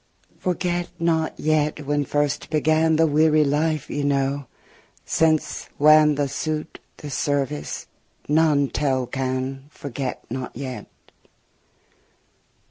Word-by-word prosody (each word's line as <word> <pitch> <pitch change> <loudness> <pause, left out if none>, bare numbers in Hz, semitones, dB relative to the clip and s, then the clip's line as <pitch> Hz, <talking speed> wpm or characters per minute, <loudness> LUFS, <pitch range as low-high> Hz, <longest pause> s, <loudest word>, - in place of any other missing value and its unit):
Forget 175 -1 -1
not 165 -2 0
yet 150 -1 0
when 145 0 0
first 145 +1 -1
began 155 +1 +2
The 165 +1 +4
weary 155 0 +4
life 150 +1 0
ye 145 - -3
knew, 140 0 0 0.6
since 160 -1 +1
whan 150 0 +6
The 145 0 0
suit, 155 +3 -4 0.2
the 145 - -8
service, 135 - -2 0.4
none 150 -2 +3
tell 135 -3 0
can, 130 +1 -3
Forget 135 -3 -5
not 130 +2 -5
yet. 130 -2 -6
145 Hz, 110 wpm, -23 LUFS, 140-155 Hz, 0.6 s, whan